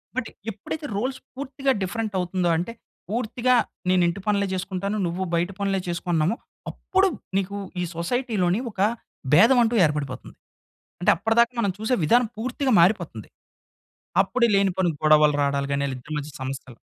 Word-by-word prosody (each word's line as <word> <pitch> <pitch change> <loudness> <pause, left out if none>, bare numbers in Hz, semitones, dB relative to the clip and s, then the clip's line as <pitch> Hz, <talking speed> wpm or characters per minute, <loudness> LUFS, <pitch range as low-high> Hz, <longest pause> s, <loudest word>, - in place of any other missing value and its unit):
But 255 -3 -2 0.2
ఎప్పుడైతే 260 +9 -6
roles 255 +5 -2 0.2
పూర్తిగా 275 0 -1
different 215 +3 -2
అవుతుందో, 180 0 0
అంటే 180 +7 -3 0.4
పూర్తిగా 245 +2 +1 0.3
నేను 185 -1 +4
ఇంటి 170 +3 -2
పనులే 200 -1 +2
చేసుకుంటాను. 190 +2 -2
నువ్వు 175 +3 -2
బయట 175 +3 +1
పనులే 195 -1 0
చేసుకున్నామో, 170 +2 0 0.4
అప్పుడు 380 +1 +1 0.3
నీకు 195 +1 -2 0.2
ఈ - - 0
సొసైటీ‌లోని 200 0 0
ఒక 195 - -15 0.5
భేదం 225 - +7
అంటూ 235 +1 +1
ఏర్పడిపోతుంది. 145 -4 -4 0.7
అంటే 180 - +5
అప్పటిదాకా 230 +6 +2
మనం 200 - +1
చూసే 220 +4 +1
విధానం 240 +9 +4
పూర్తిగా 255 +3 -1
మారిపోతుంది. 170 - +1 0.9
అప్పుడు 235 +5 +1
లేని 195 -1 +3
పోని 185 -2 +2
గొడవలు 150 -1 +5
రావడాలు 140 0 0
గాని 140 0 0
ఇద్దరి 150 +5 -9
మధ్య 150 0 -5
సమస్యలు 130 -2 -6
195 Hz, 140 wpm, -24 LUFS, 170-230 Hz, 0.9 s, భేదం